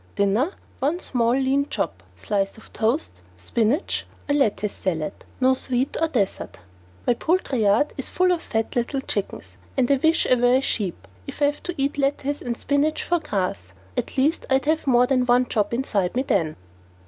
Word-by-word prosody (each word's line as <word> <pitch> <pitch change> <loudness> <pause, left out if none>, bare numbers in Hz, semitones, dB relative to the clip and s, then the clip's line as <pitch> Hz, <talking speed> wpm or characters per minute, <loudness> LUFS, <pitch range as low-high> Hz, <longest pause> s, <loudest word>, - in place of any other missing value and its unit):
"Dinner, 210 - +2 0.3
one 300 +6 0
small 235 -7 +1
lean 270 +1 +1
chop, - - -2
slice 200 -1 -2
of 220 - -16
toast, 220 - -1 0.2
spinach 225 - 0 0.2
or 285 - +1
lettuce 215 -7 +1
salad. 165 -2 -2 0.3
No 260 0 +4
dessert 260 0 -1
or 270 -11 +3
sweet." 185 - -10 0.5
My - - +4
poultry 300 -3 0
yard 210 +8 +3
is 270 - -3
full 365 0 +2
of 345 -2 0
fat 225 -6 -2
little 250 +3 0
chickens, 145 - -4 0.2
and 245 - +3
I 280 - +5
wish 320 +5 +3
I - - +4
were 245 0 +4
a 260 - +3
sheep 185 - -2 0.2
if - - -7
I 290 - +4
have 290 +1 0
to 355 - -4
eat 280 +1 0
lettuce 280 +1 0
and 235 -1 -3
spinach 290 +2 +1
for 345 0 +1
grass. 185 - -3 0.2
At - - -3
least 295 +5 +1
I'd 265 +1 +2
have 315 0 +1
more 245 -1 +5
than 255 -1 +1
one 250 +1 +4
chop 210 -4 0
inside 215 -7 0
me 260 - +1
then. 165 - 0
255 Hz, 185 wpm, -24 LUFS, 210-285 Hz, 0.5 s, I